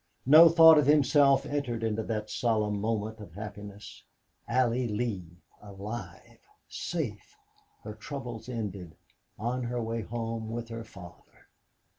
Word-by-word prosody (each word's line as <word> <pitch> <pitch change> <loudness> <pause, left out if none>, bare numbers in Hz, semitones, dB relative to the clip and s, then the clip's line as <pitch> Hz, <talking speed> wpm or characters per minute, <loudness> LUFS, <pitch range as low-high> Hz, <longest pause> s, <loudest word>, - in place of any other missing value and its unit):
No 155 +5 +9
thought 160 -1 +8
of 145 - +1
himself 145 -1 +4
entered 125 -6 -3
into 110 0 -1
that 110 -1 -3
solemn 105 -3 0
moment 110 0 -2
of 100 -6 -11
happiness. 105 -1 -9 0.4
Allie 125 -1 +1
Lee 105 -6 -4 0.2
alive 105 +3 -9 0.3
safe 420 - -5 0.5
her 105 - -7
troubles 120 +1 -7
ended 100 -8 -5 0.4
on 120 +4 -2
her 120 +1 -3
way 115 0 -3
home 115 0 -5
with 115 0 -5
her 115 0 -6
father! 95 -6 -15
115 Hz, 125 wpm, -29 LUFS, 105-125 Hz, 0.5 s, No